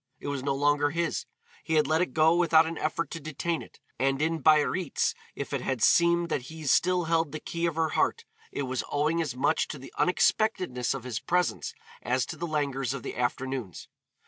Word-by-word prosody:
It -, -, -5 dB
was 140 Hz, -2 st, -2 dB
no 135 Hz, +1 st, -1 dB
longer 145 Hz, +1 st, +2 dB
his, 170 Hz, +2 st, -2 dB, 0.4 s
he 160 Hz, -, -1 dB
had 155 Hz, -1 st, +4 dB
let 155 Hz, +4 st, +2 dB
it 180 Hz, -, 0 dB
go 160 Hz, +1 st, +5 dB
without 165 Hz, -2 st, +5 dB
an 165 Hz, +1 st, -4 dB
effort 155 Hz, +2 st, -2 dB
to 165 Hz, -, -5 dB
detain 155 Hz, +2 st, -3 dB
it, -, -, -14 dB, 0.2 s
and 135 Hz, +1 st, +1 dB
in 160 Hz, +1 st, 0 dB
Biarritz 155 Hz, +2 st, +2 dB, 0.2 s
if -, -, -5 dB
it -, -, -1 dB
had 130 Hz, -4 st, -2 dB
seemed 170 Hz, 0 st, +4 dB
that 145 Hz, -, 0 dB
he 160 Hz, -1 st, -9 dB
still 180 Hz, +5 st, +3 dB
held 165 Hz, -2 st, +1 dB
the 155 Hz, -, -5 dB
key 170 Hz, +2 st, -2 dB
of 165 Hz, -, -2 dB
her 160 Hz, -1 st, +1 dB
heart, -, -, 0 dB, 0.3 s
it 140 Hz, -, -3 dB
was 130 Hz, -1 st, -2 dB
owing 155 Hz, +3 st, +1 dB
as 145 Hz, -7 st, -3 dB
much 145 Hz, +5 st, +1 dB
to 150 Hz, -, -6 dB
the 135 Hz, -, -12 dB
unexpectedness 180 Hz, -, +1 dB
of 135 Hz, -, -6 dB
his 125 Hz, -4 st, -3 dB
presence 180 Hz, 0 st, -1 dB, 0.3 s
as 125 Hz, 0 st, 0 dB
to -, -, -6 dB
the 170 Hz, +2 st, -4 dB
languors 140 Hz, -4 st, -1 dB
of 130 Hz, -, -7 dB
the -, -, -5 dB
afternoons. 125 Hz, -4 st, -3 dB
155 Hz, 210 wpm, -28 LUFS, 135-165 Hz, 0.4 s, go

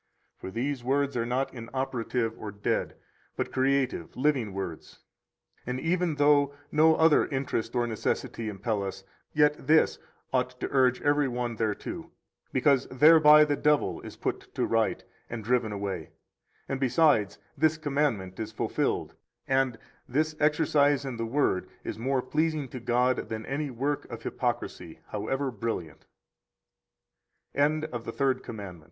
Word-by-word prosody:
For -, -, -8 dB
these 125 Hz, +5 st, -2 dB
words 140 Hz, +2 st, +1 dB
are 115 Hz, -1 st, 0 dB
not 135 Hz, +2 st, -1 dB
inoperative 125 Hz, -1 st, -2 dB
or 105 Hz, -, -5 dB
dead, 100 Hz, +1 st, -2 dB, 0.4 s
but -, -, -3 dB
creative, 130 Hz, -9 st, 0 dB
living 130 Hz, -6 st, +1 dB
words. 95 Hz, -4 st, -6 dB, 0.7 s
102 -, -, -6 dB
And 125 Hz, +1 st, -2 dB
even 170 Hz, +1 st, 0 dB
though 145 Hz, -1 st, +4 dB, 0.2 s
no 160 Hz, +1 st, +5 dB
other 160 Hz, -1 st, +4 dB
interest 130 Hz, -4 st, -2 dB
or 120 Hz, -1 st, +2 dB
necessity 110 Hz, 0 st, -2 dB
impel 105 Hz, +1 st, -2 dB
us, 95 Hz, 0 st, -5 dB, 0.3 s
yet 150 Hz, -1 st, +2 dB
this 160 Hz, +1 st, +4 dB, 0.3 s
ought 125 Hz, -1 st, 0 dB
to -, -, -2 dB
urge 130 Hz, -2 st, +3 dB
every 145 Hz, -1 st, +3 dB
one 120 Hz, -2 st, -3 dB
thereunto, 110 Hz, -2 st, -3 dB, 0.4 s
because 140 Hz, -3 st, +3 dB
thereby 150 Hz, +2 st, +7 dB
the 145 Hz, -1 st, 0 dB
devil 150 Hz, 0 st, +1 dB
is -, -, -9 dB
put -, -, -4 dB
to -, -, +1 dB
Right 115 Hz, -1 st, +1 dB, 0.3 s
and 115 Hz, -2 st, -5 dB
driven 120 Hz, -1 st, +1 dB
away, 100 Hz, -5 st, -4 dB, 0.6 s
and, 135 Hz, -, -2 dB
besides, 130 Hz, -5 st, +3 dB, 0.2 s
this 155 Hz, +2 st, +2 dB
commandment 140 Hz, -, -1 dB
is 110 Hz, -1 st, -4 dB
fulfilled, 110 Hz, -, -1 dB, 0.3 s
and 130 Hz, -3 st, +1 dB, 0.3 s
[this 155 Hz, +4 st, 0 dB
exercise 145 Hz, -2 st, +3 dB
in 130 Hz, -3 st, -4 dB
the 115 Hz, 0 st, -2 dB
Word] 120 Hz, -7 st, 0 dB
is -, -, -5 dB
more 130 Hz, +1 st, 0 dB
pleasing 155 Hz, 0 st, 0 dB
to 130 Hz, -, -7 dB
God 125 Hz, +2 st, +1 dB
than 110 Hz, 0 st, -4 dB
any 145 Hz, +2 st, -2 dB
work 140 Hz, +4 st, -2 dB
of -, -, -8 dB
hypocrisy, -, -, -3 dB
however 135 Hz, 0 st, -2 dB
brill 115 Hz, -4 st, -2 dB
130 Hz, 135 wpm, -28 LUFS, 115-145 Hz, 0.7 s, thereby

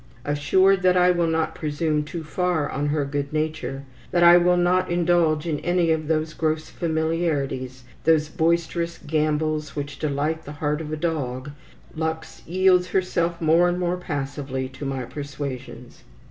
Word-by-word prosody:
Assured 185 Hz, +7 st, +3 dB
that 185 Hz, 0 st, +4 dB
I 180 Hz, 0 st, +5 dB
will 175 Hz, -1 st, +1 dB
not 160 Hz, 0 st, 0 dB
presume 150 Hz, -1 st, -1 dB
too 160 Hz, +2 st, -6 dB
far 165 Hz, -1 st, 0 dB
on 145 Hz, +1 st, -2 dB
her 145 Hz, -1 st, 0 dB
good 140 Hz, 0 st, -3 dB
nature, 155 Hz, -3 st, -3 dB, 0.3 s
that 175 Hz, -, +2 dB
I 170 Hz, 0 st, +9 dB
will 175 Hz, 0 st, +4 dB
not 180 Hz, +1 st, +2 dB
indulge 175 Hz, -3 st, +2 dB
in 155 Hz, -3 st, -1 dB
any 175 Hz, -2 st, +1 dB
of 155 Hz, -1 st, 0 dB
those 155 Hz, 0 st, 0 dB
gross 155 Hz, -1 st, -2 dB
familiarities, 160 Hz, -6 st, -2 dB, 0.2 s
those 155 Hz, -2 st, +3 dB
boisterous 170 Hz, +1 st, 0 dB
gambols 155 Hz, 0 st, -1 dB
which 145 Hz, -1 st, -5 dB
delight 155 Hz, +2 st, -1 dB
the 145 Hz, -, -8 dB
heart 150 Hz, +1 st, -2 dB
of 155 Hz, -1 st, -6 dB
a 155 Hz, -, -2 dB
dog, 145 Hz, -4 st, -3 dB, 0.4 s
Lux 160 Hz, 0 st, -4 dB
yields 180 Hz, +1 st, +3 dB
herself 175 Hz, -2 st, 0 dB
more 165 Hz, +2 st, +4 dB
and 175 Hz, -, -1 dB
more 180 Hz, 0 st, 0 dB
passively 140 Hz, -5 st, -4 dB
to 130 Hz, +2 st, -8 dB
my 135 Hz, -2 st, -3 dB
persuasions. 135 Hz, -4 st, -7 dB
160 Hz, 160 wpm, -24 LUFS, 145-175 Hz, 0.4 s, I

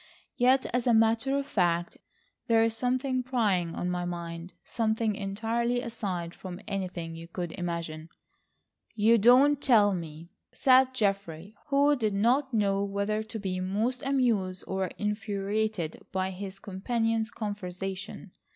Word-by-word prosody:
Yet 260 Hz, +1 st, +4 dB
as 245 Hz, 0 st, 0 dB
a 235 Hz, -, +5 dB
matter 225 Hz, +5 st, +3 dB
of 280 Hz, -, -2 dB
fact, 175 Hz, -8 st, 0 dB, 0.5 s
there 225 Hz, -2 st, +4 dB
is 225 Hz, 0 st, 0 dB
something 255 Hz, +2 st, 0 dB
preying 210 Hz, -10 st, 0 dB
on 180 Hz, -, -2 dB
my 180 Hz, 0 st, -2 dB
mind. 170 Hz, 0 st, -6 dB
Something 220 Hz, -1 st, 0 dB
entirely 225 Hz, +5 st, -1 dB
aside 195 Hz, -8 st, -4 dB
from 180 Hz, -1 st, -8 dB
anything 180 Hz, -5 st, -4 dB
you 165 Hz, 0 st, -9 dB
could 175 Hz, -1 st, -5 dB
imagine." 170 Hz, -3 st, -5 dB, 0.9 s
"You 225 Hz, +2 st, +4 dB
don't 260 Hz, +6 st, +6 dB
tell 210 Hz, -6 st, +5 dB
me!" 165 Hz, -1 st, -7 dB, 0.2 s
said 260 Hz, 0 st, +4 dB
Geoffrey, 195 Hz, -4 st, -1 dB
who 285 Hz, +1 st, +4 dB
did 215 Hz, -6 st, -1 dB
not 255 Hz, +7 st, +2 dB
know 200 Hz, -3 st, +1 dB
whether 200 Hz, +2 st, -1 dB
to 220 Hz, +1 st, -6 dB
be 190 Hz, -3 st, -3 dB
most 215 Hz, +7 st, -1 dB
amused 230 Hz, -9 st, 0 dB
or 190 Hz, 0 st, -1 dB
infuriated 210 Hz, -3 st, -2 dB
by 190 Hz, 0 st, -1 dB
his 190 Hz, +1 st, -7 dB
companion's 225 Hz, +3 st, -1 dB
conversation. 195 Hz, -1 st, -6 dB
205 Hz, 135 wpm, -28 LUFS, 185-235 Hz, 0.9 s, don't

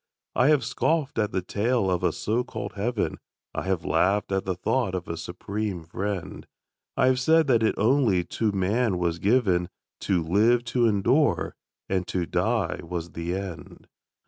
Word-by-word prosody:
I 125 Hz, -, +4 dB
have 150 Hz, -5 st, +4 dB
scoffed 145 Hz, +2 st, 0 dB
at 105 Hz, -1 st, +1 dB
the 95 Hz, -, -1 dB
tale 105 Hz, 0 st, 0 dB
of 90 Hz, -, 0 dB
a 90 Hz, -, +3 dB
so 115 Hz, +9 st, -1 dB
called 100 Hz, -5 st, -6 dB
heaven; 110 Hz, +2 st, -2 dB, 0.3 s
I -, -, -3 dB
have -, -, -1 dB
laughed 100 Hz, +2 st, +1 dB
at 95 Hz, 0 st, 0 dB
the 95 Hz, -1 st, -1 dB
thought 100 Hz, +2 st, 0 dB
of 90 Hz, -1 st, -4 dB
a 85 Hz, -, -3 dB
Supreme 100 Hz, 0 st, -4 dB
Friend; 95 Hz, +3 st, -5 dB, 0.5 s
I 135 Hz, -, +4 dB
have 130 Hz, 0 st, +3 dB
said 160 Hz, +5 st, +4 dB
that 120 Hz, -5 st, +3 dB
it 110 Hz, -, +2 dB
only 110 Hz, -5 st, +3 dB
to 105 Hz, +5 st, -1 dB
man 100 Hz, +2 st, +1 dB
was 85 Hz, -1 st, -1 dB
given 95 Hz, -5 st, +2 dB, 0.3 s
To 90 Hz, -4 st, 0 dB
live, 110 Hz, +8 st, +3 dB
to 120 Hz, -2 st, +4 dB
endure; 115 Hz, +8 st, +2 dB, 0.3 s
and 95 Hz, -1 st, -1 dB
to 90 Hz, -2 st, -1 dB
die -, -, 0 dB
was 85 Hz, 0 st, -5 dB
the 85 Hz, +2 st, -3 dB
end. 95 Hz, -5 st, -7 dB
100 Hz, 170 wpm, -26 LUFS, 90-120 Hz, 0.5 s, I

